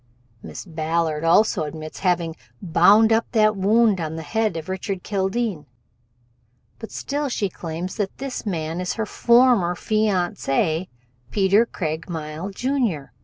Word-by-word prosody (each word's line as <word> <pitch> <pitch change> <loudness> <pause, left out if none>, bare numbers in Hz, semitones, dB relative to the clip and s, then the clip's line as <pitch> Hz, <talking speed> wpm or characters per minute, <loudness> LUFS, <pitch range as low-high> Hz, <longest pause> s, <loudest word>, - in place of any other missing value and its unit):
Miss - - -8
Ballard 160 -2 -1
also 180 +3 +4
admits 155 +1 -6
having 170 -3 0 0.2
bound 200 +5 +5
up 225 +1 +1
that 215 -1 +4
wound 205 0 +3
on 160 0 -4
the 160 - -5
head 215 +2 -1
of 160 - -6
Richard 190 0 -4
Kildene, 195 -4 -2 1.1
but 225 - -8
still 285 0 -3
she 205 -5 -1
claims 170 +1 -6
that 205 -3 -3
this 270 -1 -5
man 165 -3 -3
is 180 - -2
her 225 - -2
former 235 -7 +3
fiancé, 180 -5 0 0.4
Peter 200 +3 +3
Craigmile, 160 0 -4
Jr. 225 - -1
190 Hz, 130 wpm, -22 LUFS, 165-220 Hz, 1.1 s, bound